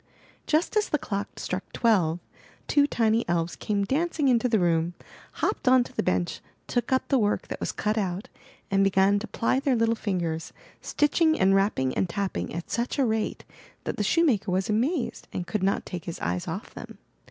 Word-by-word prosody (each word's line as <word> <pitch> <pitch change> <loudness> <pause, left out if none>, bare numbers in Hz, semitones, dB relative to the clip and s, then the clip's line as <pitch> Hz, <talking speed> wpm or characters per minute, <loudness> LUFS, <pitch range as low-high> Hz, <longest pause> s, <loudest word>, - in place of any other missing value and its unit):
Just 320 +7 +1
as 425 -1 +2
the 300 - +2
clock 200 -6 -4
struck 185 +1 -4
twelve, 185 -9 +2 0.5
two 285 -1 +4
tiny 225 -3 +2
elves 170 0 0
came 205 -1 -1
dancing 295 - +1
into 245 0 +3
the 225 - +3
room, 170 -1 +1 0.4
hopped - - -2
onto 255 -1 +4
the - - 0
bench, 90 -1 -1 0.3
took 240 0 -2
up 260 - +2
the 270 - +4
work 210 -2 0
that - - -5
was - - -2
cut 215 +1 -1
out, 190 +3 -3 0.4
and 195 0 +4
began 195 +1 +3
to 225 - -6
ply 245 +3 0
their 275 -2 +1
little 230 0 +2
fingers, 175 -7 -3 0.3
stitching 315 +2 +2
and 190 +1 +4
rap 195 +2 +3
ping 130 0 0
and 185 - 0
tapping 195 +1 -2
at 170 +1 -6
such 240 +4 -1
a 275 - +3
rate 220 -1 -1 0.4
that - - -4
the 210 - 0
shoemaker 220 - +2
was 190 +3 0
amazed, 250 +6 -1
and 180 - -4
could 215 +2 -2
not 195 +1 +1
take 180 -2 -6
his 170 - -5
eyes 90 +1 -2
off - - -5
them. - - -10
210 Hz, 195 wpm, -26 LUFS, 185-250 Hz, 0.5 s, two